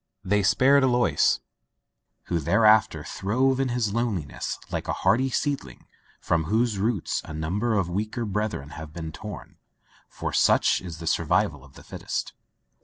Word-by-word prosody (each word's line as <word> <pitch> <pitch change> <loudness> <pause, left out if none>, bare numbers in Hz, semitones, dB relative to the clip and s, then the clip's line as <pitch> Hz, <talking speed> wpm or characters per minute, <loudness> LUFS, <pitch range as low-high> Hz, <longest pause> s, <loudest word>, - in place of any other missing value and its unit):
They 105 +1 +2
spared 135 +8 +4
Alois, 125 -2 +3 0.9
who 85 - -1
thereafter 105 +6 +4
throve 130 +7 0
in 135 -1 +1
his 120 -4 -1
loneliness 105 -11 -2
like - - -3
a - - 0
hardy 130 +4 +3
seedling 140 +2 -3 0.3
from 80 -2 0
whose 110 +2 +1
roots 105 -3 -1
a 80 - -8
number 100 +9 -1
of 100 -4 +1
weaker 110 +6 -3
brethren 105 -8 -3
have 80 -1 -9
been 80 -1 -6
torn, - - -9 0.5
for - - -5
such - - +3
is 85 -3 -7
the 85 - -8
survival 70 -3 +1
of 70 -1 -17
the - - -14
fittest. - - -5
105 Hz, 150 wpm, -25 LUFS, 85-120 Hz, 0.9 s, spared